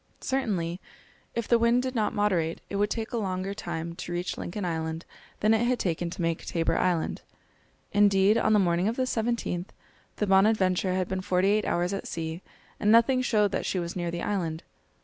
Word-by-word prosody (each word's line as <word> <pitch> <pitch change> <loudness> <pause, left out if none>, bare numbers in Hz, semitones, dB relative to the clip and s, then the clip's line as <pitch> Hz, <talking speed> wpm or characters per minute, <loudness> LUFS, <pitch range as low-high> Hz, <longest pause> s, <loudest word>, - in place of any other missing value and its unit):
Certainly, 190 -10 -1 0.5
if 235 -1 -2
the 235 - +4
wind 235 +2 +3
did 260 -1 -2
not 220 -4 +1
moderate, 180 -6 0
it 200 - -1
would 205 +1 +2
take 225 +1 -3
a 240 - -2
longer 190 -2 -2
time 170 -4 -5
to 180 - -6
reach 175 +1 -2
Lincoln 190 +2 -5
Island 160 -1 -3 0.4
than 215 +1 +4
it 225 +1 +2
had 250 0 +2
taken 175 -3 -1
to 175 - -5
make 165 -1 -1
Tabor 165 -1 0
Island. 175 -3 0 0.7
Indeed, 200 0 +4
on 220 -1 +3
the - - +6
morning 175 -1 +2
of 225 - 0
the 260 - 0
17th, 225 -7 -1 0.5
the 210 - 0
Bonadventure 190 -2 +3
had 185 -1 0
been 190 0 -2
forty 185 0 +2
eight 210 +1 +2
hours 175 +2 0
at 195 - -4
sea, 165 +1 -4 0.4
and 210 - +3
nothing 235 +3 +5
showed 210 -5 +2
that - - -2
she - - -1
was 170 -1 -3
near 175 -2 -2
the 170 0 -4
island. 170 -5 -2
190 Hz, 200 wpm, -27 LUFS, 175-215 Hz, 0.7 s, the